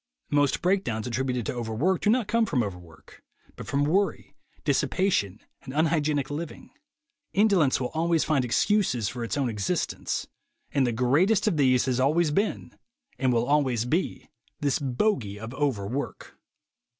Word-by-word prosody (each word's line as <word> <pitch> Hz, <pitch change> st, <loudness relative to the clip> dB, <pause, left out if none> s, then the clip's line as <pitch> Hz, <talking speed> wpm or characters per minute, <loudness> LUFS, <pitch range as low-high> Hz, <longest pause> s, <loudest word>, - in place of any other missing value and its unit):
Most 145 Hz, -1 st, +2 dB
breakdowns 175 Hz, -, 0 dB
attributed 125 Hz, -1 st, -2 dB
to -, -, -2 dB
overwork 120 Hz, +10 st, -1 dB
do -, -, +2 dB
not 230 Hz, -2 st, +2 dB
come 230 Hz, 0 st, +2 dB
from 125 Hz, -5 st, +1 dB
overwork, 90 Hz, -5 st, -10 dB, 0.3 s
but -, -, -9 dB
from 140 Hz, +1 st, +1 dB
worry, 190 Hz, +7 st, 0 dB, 0.3 s
dissipation 110 Hz, -, +1 dB, 0.2 s
and 130 Hz, 0 st, -9 dB
unhygienic 150 Hz, -3 st, +1 dB
living. 155 Hz, +2 st, -6 dB, 0.6 s
Indolence 195 Hz, -9 st, +3 dB
will 125 Hz, -1 st, -2 dB
always 165 Hz, 0 st, +1 dB
find 140 Hz, -4 st, +1 dB
excuses 125 Hz, -, +1 dB
for 120 Hz, +1 st, -4 dB
its 115 Hz, +5 st, -3 dB
own 140 Hz, -3 st, +1 dB
existence; 105 Hz, -4 st, -2 dB, 0.5 s
and 135 Hz, -3 st, +2 dB
the -, -, +1 dB
greatest 140 Hz, -, +2 dB
of 185 Hz, -7 st, +1 dB
these 130 Hz, -3 st, +3 dB
has 130 Hz, -1 st, 0 dB
always 150 Hz, +4 st, +2 dB
been, 200 Hz, +8 st, -1 dB, 0.4 s
and 130 Hz, -2 st, +2 dB
will 120 Hz, -1 st, +2 dB
always 130 Hz, -5 st, +1 dB
be, 160 Hz, +9 st, -2 dB, 0.3 s
this 140 Hz, -1 st, 0 dB
bogey 130 Hz, -, -1 dB
of 110 Hz, +3 st, -7 dB
"overwork." 135 Hz, -2 st, -3 dB
140 Hz, 150 wpm, -26 LUFS, 120-170 Hz, 0.6 s, Indolence